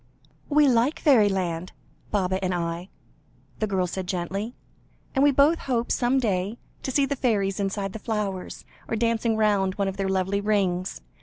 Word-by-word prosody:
"We 295 0 +5
like 250 +4 +2
fairyland 190 - +2 0.4
Baba 190 -2 0
and 185 -1 0
I," 170 +2 -3 0.7
the 215 - 0
girl 190 -2 +1
said 180 +1 -4
gently, 195 +5 -3 0.6
"and 270 - +3
we 290 - +6
both 285 +4 +4
hope, 240 -3 -1
some 250 +2 +2
day, 205 -3 0 0.2
to - - -4
see 275 +2 +3
the 280 - -2
fairies 205 -7 0
inside 195 0 -2
the 220 - -6
flowers, 205 -4 -3 0.2
or - - -1
dancing 230 0 +1
round 200 -3 +2
one 200 -1 0
of 195 0 -4
their 195 -1 -1
lovely 190 +1 0
rings. 195 -3 0
200 Hz, 165 wpm, -25 LUFS, 190-235 Hz, 0.7 s, we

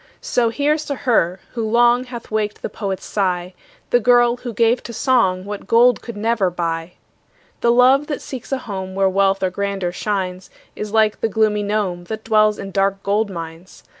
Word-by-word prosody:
So 235 -2 +1
here's 295 +5 0
to 280 - -3
her, 195 -9 +1
who 230 - -3
long 240 +3 +3
Hath 240 -3 -9
waked 215 -1 -2
the - - -4
poet's 195 -3 -4
sigh, 180 -3 -1 0.4
The 245 - +5
girl, 240 0 +4
who 245 -1 -6
gave 230 +2 +2
to 235 - -8
song 220 -6 +1
What 205 -1 -7
gold 240 +2 +4
could 235 -3 -8
never 215 -3 +1
buy. 165 -1 -3 0.7
The 235 - +3
love 260 +4 +4
that 290 - -3
seeks 260 -1 -8
a 270 - +1
home 190 -6 -6
Where 195 0 +3
wealth 195 0 +1
or 185 - +1
grandeur 195 -1 -2
shines, 185 -1 -3 0.3
Is 210 -1 -5
like 215 -1 +2
the 225 - +1
gloomy 215 0 +1
gnome, 200 -4 -2
That 220 +3 -6
dwells 215 -1 +3
in 195 0 -7
dark 195 +1 0
gold 205 +2 +1
mines. 165 0 -9
210 Hz, 190 wpm, -20 LUFS, 190-235 Hz, 0.7 s, The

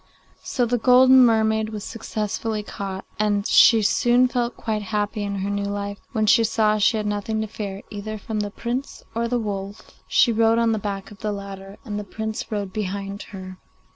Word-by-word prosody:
So 245 - 0
the 240 +1 0
golden 255 +2 +7
mermaid 220 -2 +3
was 210 -2 -6
successfully 215 -1 -3
caught, 195 -2 -6
and 205 -1 +1
she 225 -1 +6
soon 240 +4 +4
felt 245 -1 -2
quite 215 -2 -2
happy 210 +1 -2
in 200 -1 -2
her - - -2
new 200 0 -1
life 200 0 -4
when 220 -3 +1
she 225 +2 +5
saw 215 -1 +2
she 220 +2 +3
had 210 - -2
nothing 210 +1 -2
to - - -1
fear 200 -2 -6
either 215 +1 -5
from 215 +1 -4
the 205 0 -2
Prince 245 +6 -5
or 230 +1 -1
the 245 +1 0
wolf 200 -2 -5 0.2
she 240 - +4
rode 225 0 +3
on 230 -1 +3
the 220 - 0
back 200 0 -5
of 210 - -13
the 215 -1 -2
latter, 195 -1 -8
and 210 -3 -4
the - - -4
Prince 220 +3 -5
rode 200 -3 -3
behind 200 -1 -4
her. 185 -3 -9
215 Hz, 200 wpm, -23 LUFS, 200-225 Hz, 0.2 s, golden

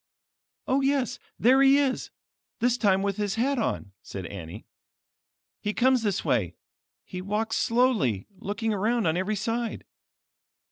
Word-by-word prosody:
"Oh 270 +1 +2
yes, 270 -3 0 0.2
there 260 +4 +5
he 275 0 +6
is; 275 -3 0 0.5
this 245 +1 +2
time 195 -5 +2
with 200 0 -1
his 205 -2 -1
hat 260 +3 +1
on," 110 - -2
said 95 -2 -7
Annie. 85 -3 -8 1.0
"He 210 0 -2
comes 255 0 +3
this 205 -4 -1
way; 90 -8 0 0.5
he 180 - -6
walks 215 +3 -1
slowly, 230 - +2
looking 210 +3 -2
around 220 +3 +1
on 160 0 +2
every 190 +4 -1
side. 230 +2 -2
220 Hz, 140 wpm, -27 LUFS, 190-250 Hz, 1.0 s, he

